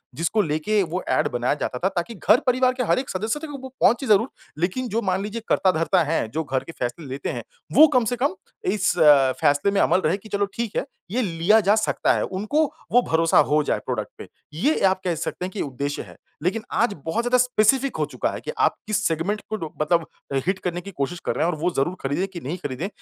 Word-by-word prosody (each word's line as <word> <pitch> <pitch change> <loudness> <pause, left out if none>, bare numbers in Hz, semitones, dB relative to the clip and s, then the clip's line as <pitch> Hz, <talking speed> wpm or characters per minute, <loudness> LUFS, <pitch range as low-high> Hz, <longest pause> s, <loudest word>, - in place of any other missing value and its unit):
जिसको 170 +7 +1
लेके 155 +8 +1
वो 180 +3 -2
ऐड 130 - +2
बनाया 120 +2 0
जाता 125 - -2
था 190 - +1
ताकि 190 +3 -3
घर 215 +5 +4
परिवार 255 0 +3
के 255 - -2
हर - - +3
एक 265 - -5
सदस्य 220 +9 -2
तक 315 - -7
वो 285 - -6
वो 265 - -6
पहुँचे 255 +3 +3
ज़रूर। 215 +4 +4 0.3
लेकिन 195 +9 -1
जो 225 +2 0
मान 190 -2 0
लीजिए 215 +3 -5
कर्ता 190 - +3
धर्ता 170 +2 +2
है 155 -6 0
जो 160 +9 -3
घर 135 -3 -2
के - - -9
फ़ैसले 125 +6 -3
लेते 135 +1 -4
हैं - - -4 0.3
वो 315 +1 +9
कम 250 -2 +4
से 245 - 0
कम 305 +7 +1 0.4
इस 200 -2 +1 0.5
फ़ैसले 145 +5 +3
में 200 - +1
अमल 185 - +3
रहे 165 +5 +2
कि 215 +2 -14
चलो 200 0 +1
ठीक 230 -3 -3
है - - 0 0.3
ये 250 - +1
लिया 185 +1 +3
जा 205 - +6
सकता 220 - +1
है। - - 0
उनको 210 +11 0 0.3
वो 245 - +6
भरोसा 165 0 +3
हो 150 0 +4
जाए - - 0
प्रोडक्ट - - -3
पे - - -9 0.3
ये 270 - +1
आप 190 0 +2
कह 175 -2 0
सकते 170 +3 -4
हैं 185 - -6
कि 200 - -4
उद्देश्य 140 +1 -3
है। - - -14 0.3
लेकिन 195 +6 0
आज 230 -3 +1
बहुत 215 +9 -1
ज़्यादा 250 +1 +3
स्पेसिफ़िक 250 +2 +2
हो - - +1
चूका - - -2
है - - -6
कि - - -2
आप - - +3
किस 210 -1 0
सेगमेंट 170 +6 -1
को 220 - -1
डो 160 -6 -6
मतलब 165 +1 +2 0.4
हिट 190 0 +1
करने 175 -1 -2
की 200 - -9
कोशिश 155 +6 -2
कर - - -1
रहे - - +1
हैं 175 - +2
और - - -5
वो 175 +3 +1
ज़रूर 170 +7 +1
खरीदें 145 +8 -1
कि 190 -3 -8
नहीं 150 +8 -3
खरीदें। 145 +6 -3
190 Hz, 245 wpm, -23 LUFS, 160-220 Hz, 0.5 s, वो